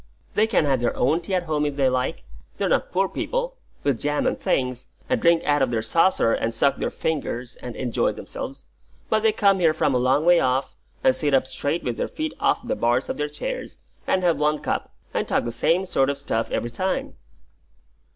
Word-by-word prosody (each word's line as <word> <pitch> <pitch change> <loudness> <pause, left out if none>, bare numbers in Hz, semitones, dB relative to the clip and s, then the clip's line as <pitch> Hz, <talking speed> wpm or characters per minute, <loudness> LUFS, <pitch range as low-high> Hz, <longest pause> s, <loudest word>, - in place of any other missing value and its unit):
They 215 +1 +3
can 210 -8 +2
have 135 -3 +2
their 120 0 -1
own 150 +7 +2
tea 185 +3 -2
at 180 - +1
home 155 -3 -1
if 145 -1 -1
they 140 -2 +3
like, 130 - -1 0.3
they're - - 0
not - - +1
poor 190 +2 +2
people, - - -3 0.3
with 135 -5 +1
jam 145 0 0
and - - +2
things, 125 -1 -1 0.2
and 255 -2 0
drink 170 -1 +4
out 145 -1 +2
of 135 - +3
their 115 -2 -1
saucer, 165 -2 +3
and 115 - 0
suck 140 +4 +2
their - - -1
fingers 125 -6 -3
and 125 -2 -8
enjoy 125 -3 0
themselves; - - -7 0.5
but 220 - +3
they 220 0 +4
come 200 -3 +3
here 160 -3 +3
from 145 - +1
a 125 - +2
long 130 +5 +2
way 175 0 +6
off, 130 +1 0 0.3
and 130 - +4
sit 145 -3 +1
up 130 - +3
straight 145 +5 -2
with 120 -2 -2
their - - -1
feet 315 -1 -4
off 240 - +1
the 265 - 0
bars 120 - +1
of - - -3
their 150 0 -1
chairs, - - -5 0.3
and 185 - +1
have 170 -4 +2
one 150 0 +2
cup, - - -3 0.2
and - - -1
talk - - +1
the 120 - -3
same 170 +10 +1
sort 135 -7 +1
of 140 - -1
stuff 115 -3 -2
every 120 - -2
time." 185 +10 -2
145 Hz, 220 wpm, -24 LUFS, 125-180 Hz, 0.5 s, way